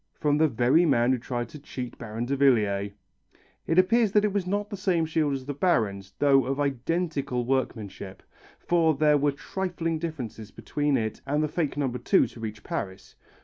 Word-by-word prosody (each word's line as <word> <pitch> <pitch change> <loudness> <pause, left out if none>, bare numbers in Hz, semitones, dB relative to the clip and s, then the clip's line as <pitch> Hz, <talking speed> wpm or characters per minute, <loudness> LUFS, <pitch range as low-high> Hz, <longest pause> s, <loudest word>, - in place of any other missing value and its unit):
From 150 -1 +2
the 160 - +5
very 125 +6 +3
man 125 -6 +3
who 130 - +1
tried 120 0 -4
to 150 - -10
cheat 125 -4 -7
Baron 115 0 -4
Davillier. 110 -7 +2 0.8
It 165 - +1
appears 210 +3 +4
it 210 -1 +3
was 200 -3 -1
not 205 +2 -2
the - - -3
same 185 -4 +1
shield 155 -3 0
as 130 -1 -6
the 145 - -3
Baron's, 100 - 0
though 140 -2 +4
of 135 +1 -2
identical 140 -2 -1
workmanship, 110 -7 -3 0.3
for 165 -3 +2
there 150 0 +3
were 145 +1 +2
trifling 165 +1 -3
differences 125 -10 -6
between 145 +4 -1
it 110 -1 -3
and 150 +2 +1
the - - +1
fake 150 -2 -2
No. 145 -2 +1
2 125 -1 +2
to - - -11
reach 110 -2 -6
Paris. 95 -1 -5
140 Hz, 180 wpm, -26 LUFS, 120-165 Hz, 0.8 s, the